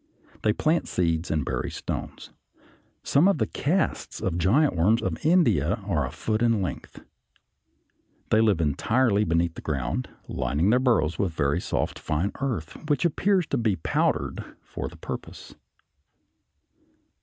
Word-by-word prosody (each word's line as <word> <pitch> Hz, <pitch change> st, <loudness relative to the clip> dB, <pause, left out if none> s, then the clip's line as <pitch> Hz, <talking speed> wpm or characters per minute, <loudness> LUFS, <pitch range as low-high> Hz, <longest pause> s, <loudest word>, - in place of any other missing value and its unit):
They 105 Hz, -, +3 dB
plant 155 Hz, +9 st, +1 dB
seeds 85 Hz, -1 st, 0 dB
and 75 Hz, -4 st, 0 dB
bury 65 Hz, -2 st, -2 dB
stones. -, -, -6 dB, 0.7 s
Some 150 Hz, +7 st, +4 dB
of 200 Hz, -, +3 dB
the -, -, +1 dB
casts 180 Hz, +7 st, -1 dB
of 90 Hz, -2 st, -2 dB
giant 130 Hz, -, +3 dB
worms 100 Hz, +8 st, +3 dB
of -, -, -3 dB
India 135 Hz, -, +3 dB
are -, -, 0 dB
a -, -, -8 dB
foot 110 Hz, 0 st, -2 dB
in 115 Hz, -2 st, +3 dB
length. 95 Hz, -, -5 dB, 1.3 s
They 110 Hz, -, +5 dB
live 105 Hz, -6 st, +3 dB
entirely 105 Hz, -, +2 dB
beneath 85 Hz, -1 st, +1 dB
the -, -, -9 dB
ground, 65 Hz, -4 st, -2 dB, 0.2 s
lining 80 Hz, +9 st, 0 dB
their 125 Hz, -, +4 dB
burrows 115 Hz, -, +1 dB
with 95 Hz, -4 st, 0 dB
very 70 Hz, -2 st, 0 dB
soft -, -, -2 dB
fine 80 Hz, +6 st, -1 dB
earth, 110 Hz, -, -3 dB
which 145 Hz, +4 st, +2 dB
appears 185 Hz, +2 st, +2 dB
to 140 Hz, -, 0 dB
be 110 Hz, -4 st, +1 dB
powdered 80 Hz, -, -1 dB, 0.2 s
for -, -, -6 dB
the -, -, -11 dB
purpose. -, -, -8 dB
105 Hz, 145 wpm, -26 LUFS, 80-130 Hz, 1.3 s, They